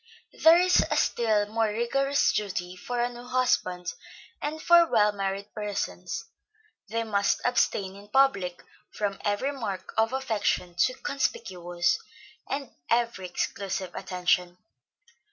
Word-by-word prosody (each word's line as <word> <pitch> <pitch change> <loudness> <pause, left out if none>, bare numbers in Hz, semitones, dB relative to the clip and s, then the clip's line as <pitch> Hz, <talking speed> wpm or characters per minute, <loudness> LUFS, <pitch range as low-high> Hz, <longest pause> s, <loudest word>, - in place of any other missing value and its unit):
There 325 +1 +9
is 360 0 +4
a - - +1
still 215 -3 +2
more 220 +1 0
rigorous 275 +6 +1
duty 180 -3 -2
for 245 +6 -4
a 240 - +2
new 245 0 -10
husband, 185 -8 0 0.5
and 305 +2 -3
for 340 +1 +6
well 210 -5 +4
married 195 0 -4
persons; 210 -1 -4 0.6
they 230 +3 -1
must 200 -2 +1
abstain 215 -6 +1
in 200 +1 -13
public 205 -9 +2 0.3
from 205 -2 -2
every 205 +7 0
mark 220 -9 -5
of 225 +1 +3
affection 220 -8 -1
too 255 +9 +2
conspicuous, 175 -11 -1 0.5
and 275 -1 -4 0.2
every 235 -5 +1
exclusive 190 0 -3
attention. 180 -1 0
210 Hz, 125 wpm, -27 LUFS, 195-250 Hz, 0.6 s, There